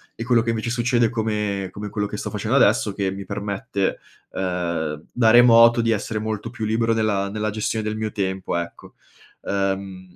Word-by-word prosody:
e 115 - -5
quello 120 -2 +3
che 115 0 -1
invece 115 +1 -2
succede 120 -1 +2
come 105 -4 -2
come 105 +2 -7
quello 105 0 -2
che - - -6
sto - - -4
facendo - - -2
adesso, - - +3
che 95 -1 -1
mi 100 0 -7
permette, 100 -1 -3 0.3
uhm, 85 -4 -3
da 115 -2 +3
remoto 115 -1 +7
di 115 0 +1
essere 110 0 -2
molto 110 +1 -4
più 115 -2 -7
libero 115 +1 +1
nella 105 -3 0
nella 110 +1 -2
gestione 110 +1 -2
del 110 0 -3
mio 110 0 -3
tempo, 95 -3 -2
ecco. 85 0 -6 0.5
Uhm, 95 -2 -3
105 Hz, 185 wpm, -22 LUFS, 95-115 Hz, 0.5 s, remoto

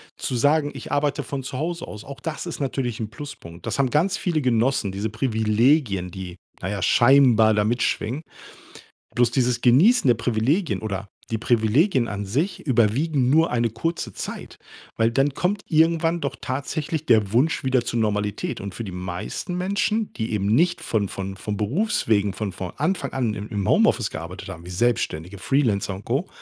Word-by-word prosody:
Zu 125 - -3
sagen: 145 +3 +2
„Ich 135 - -7
arbeite 145 0 0
von 135 -2 -5
zu 130 - -5
Hause 170 +4 -3
aus,” 105 0 -9
auch 140 -2 -9
das 155 +5 -4
ist 170 -4 -6
natürlich 125 -4 -2
'n 110 - -3
Pluspunkt. 110 - -10
Das - - -3
haben 130 - +3
ganz 170 +8 +2
viele 165 -6 -1
genossen, 115 -4 +1
diese 105 +3 -2
Privilegien, 110 - +1
die 90 0 -8 0.2
na 95 - -3
ja, 100 -2 -3
scheinbar 120 -2 +5
da 105 -1 +2
mitschwingen. 120 +3 0 1.0
Bloß, 120 -1 +3
dieses 125 -1 +1
Genießen 165 - +5
der 120 - +6
Privilegien 120 - 0
oder 100 -2 -4 0.2
die 110 - +1
Privilegien 120 - +2
an 100 -1 -4
sich 150 - -1
überwiegen 130 +3 +2
nur 160 +5 +4
eine 120 -1 +1
kurze 140 +10 -3
Zeit, - - -7 0.4
weil 115 +1 +3
dann 135 +3 +1
kommt 190 +6 -1
irgendwann 165 +1 +2
doch 140 - -3
tatsächlich 150 +4 -3
der 110 -4 +3
Wunsch 135 +8 +2
wieder 130 -2 +2
zur 120 - -2
Normalität. 105 -2 -1
Und 100 -1 -6
für 115 - -4
die 95 - -6
meisten 90 - -5
Menschen, 200 +4 0
die 110 -1 -4
eben 100 -2 0
nicht 170 - +3
von 105 -3 -1
von 95 0 -5
von 105 +1 -4
Berufswegen 110 - +1
von 105 -2 -3
von 90 -1 -6
Anfang 155 -2 -1
an 120 -5 0
im 105 0 -6
im 100 -2 -2
Home-Office - - +3
gearbeitet - - -7
haben, 85 +1 -8
wie 90 - -9
Selbstständige, 95 -3 -1
Freelancer 100 -4 0
und 95 - -11
Co. 140 +10 -1
120 Hz, 180 wpm, -23 LUFS, 105-145 Hz, 1.0 s, der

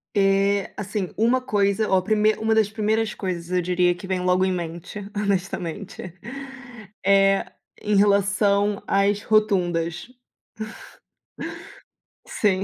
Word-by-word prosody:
E, 195 0 +2
assim, 200 -2 -3
uma 240 +4 +3
coisa, 205 -2 +1
ó, 190 -1 +4
prime 215 +2 +2
uma 220 0 +1
das 220 -2 +3
primeiras 220 +1 0
coisas 175 -3 -4
eu 180 0 +2
diria 180 0 +2
que 185 +2 -10
vem 185 -1 -1
logo 180 +1 +2
em 190 - +1
mente, 170 +2 -5 0.2
honestamente. 190 -2 -3 0.9
É 195 0 +4 0.3
em 210 0 +1
relação 200 0 +3
às 200 +1 +2
rotundas. 175 -6 +1 2.2
Sim. 195 -3 0
200 Hz, 115 wpm, -23 LUFS, 185-210 Hz, 2.2 s, ó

